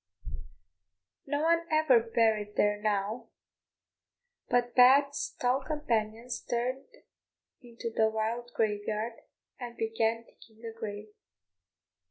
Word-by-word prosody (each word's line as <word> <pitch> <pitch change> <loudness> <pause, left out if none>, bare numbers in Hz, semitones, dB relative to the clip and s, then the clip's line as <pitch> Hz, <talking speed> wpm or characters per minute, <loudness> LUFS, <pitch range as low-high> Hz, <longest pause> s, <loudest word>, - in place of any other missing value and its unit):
No 290 +2 -1
one 335 +1 +2
ever 310 -6 +5
buried 220 -2 0
there 205 0 +2
now, 210 +1 -1 1.2
but 245 0 +1
Pat's 275 +3 +5
tall 255 +2 +1
companions 240 -5 -2
turned 250 +3 -2 0.8
into 235 -2 -7
the 220 0 +3
wild 225 +2 -2
graveyard, 215 +1 -1 0.5
and 240 -2 -7
began 225 0 0
digging 225 0 -18
a 225 - -6
grave. 210 -1 -7
230 Hz, 100 wpm, -30 LUFS, 220-250 Hz, 1.2 s, ever